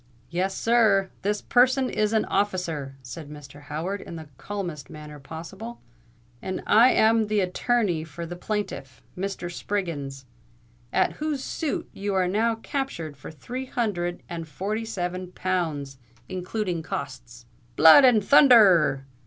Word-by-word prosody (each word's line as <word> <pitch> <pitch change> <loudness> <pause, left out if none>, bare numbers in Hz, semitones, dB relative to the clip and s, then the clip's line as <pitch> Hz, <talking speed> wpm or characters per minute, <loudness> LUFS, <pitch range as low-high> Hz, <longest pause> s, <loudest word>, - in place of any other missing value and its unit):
"Yes, 190 +3 -1
sir—this 210 -3 +2
person 260 +1 +3
is 215 -3 0
an 220 -1 +2
officer," 175 -9 -2
said 145 +4 -8
Mr. 145 -1 -11
Howard, 160 +7 -4
in - - -9
the 160 -2 -8
calmest 175 -9 -5
manner 150 -1 -10
possible; 170 +11 -9 0.6
"and 185 - -4
I 230 +4 +6
am 220 -2 +3
the 210 0 +1
attorney 185 -2 0
for 165 +1 -7
the 175 +1 -7
plaintiff—Mr. 185 -1 -5
Spriggins—at 125 - -4
whose 300 -3 -2
suit 315 -4 -3
you 200 0 -3
are 185 -1 +2
now 225 +5 +1
captured 225 - -4
for 135 - -10
three 250 - -7
hundred 175 -8 -2
and 165 -1 -6
forty 200 +9 -3
seven 180 -3 -4
pounds, 155 -7 -2 0.3
including 185 -1 -3
costs." 120 -6 -7 0.3
"Blood 160 - +9
and 240 -5 +5
thunther 280 +3 +7
r!" 165 -11 +5
180 Hz, 130 wpm, -25 LUFS, 150-215 Hz, 0.6 s, Blood